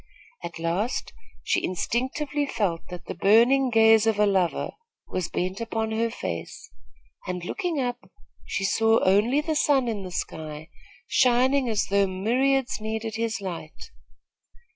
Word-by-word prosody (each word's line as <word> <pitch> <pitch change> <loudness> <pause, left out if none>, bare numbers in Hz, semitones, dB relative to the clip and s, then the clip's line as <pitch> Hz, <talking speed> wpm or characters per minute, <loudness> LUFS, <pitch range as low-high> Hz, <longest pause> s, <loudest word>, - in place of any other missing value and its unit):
At 170 -1 -6
last, 170 +8 -2 0.3
she - - 0
instinctively 265 - -1
felt 200 -10 -1
that 180 -1 -8
the - - -5
burning 245 +6 +4
gaze 225 -1 +5
of 220 -2 +2
a 210 - +4
lover 190 -4 +1 0.4
was 180 -2 -3
bent 185 +4 -3
upon 225 -1 -2
her 230 +1 0
face, 85 - -6 0.6
and, 180 -1 -4
looking 350 - -2
up, 245 -1 -3 0.3
she 195 - -3
saw 225 +3 +3
only 210 +9 +3
the 315 0 -2
sun 275 -4 +3
in 220 -3 -2
the 185 - -6
sky, 155 -3 -6 0.4
shining 255 +1 +3
as 215 -2 +1
though 200 0 +2
myriads 245 +6 0
needed 220 +1 -3
his 230 -2 -2
light. 185 - -7
220 Hz, 140 wpm, -25 LUFS, 185-250 Hz, 0.6 s, gaze